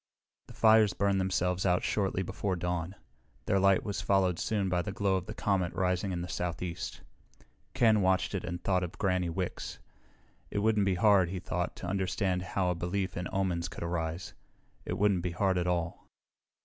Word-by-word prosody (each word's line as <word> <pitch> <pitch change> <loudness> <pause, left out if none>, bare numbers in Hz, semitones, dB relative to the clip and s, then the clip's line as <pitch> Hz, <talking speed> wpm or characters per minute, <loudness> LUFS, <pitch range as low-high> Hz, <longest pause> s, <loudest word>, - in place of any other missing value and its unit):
The - - -13
fires 110 -3 +5
burned 100 -1 +1
themselves 90 -1 0
out 90 -1 +2
shortly 95 -2 0
before 95 +1 -2
dawn. 90 +1 -3 0.5
Their 95 - +2
light 95 0 +4
was 100 - -3
followed 95 -3 +2
soon 105 -3 0
by 90 -1 +1
the 95 - -4
glow 100 -1 +1
of 95 -1 -3
the 110 - -6
comet 95 -4 0
rising 90 +1 0
in 85 -1 -2
the - - -5
southeast. 90 0 -4 0.7
Ken 110 -3 +4
watched 95 +1 +2
it 95 - -2
and 85 0 -5
thought 95 -2 +2
of 90 - -6
Granny 90 -3 +1
Wicks. 90 +2 -4 0.7
It - - -4
wouldn't 105 -1 +2
be 95 - +2
hard, 95 -2 +4
he 95 0 -4
thought, 90 0 -3
to - - -7
understand 95 0 0 0.2
how 90 -2 +2
a - - +1
belief 90 +3 -2
in 90 0 -3
omens 90 -3 -1
could - - -7
arise. 85 0 -3 0.5
It - - -2
wouldn't 100 -3 +2
be 85 0 -3
hard 95 0 +1
at 90 - -1
all. 85 -2 -2
95 Hz, 190 wpm, -30 LUFS, 90-100 Hz, 0.7 s, fires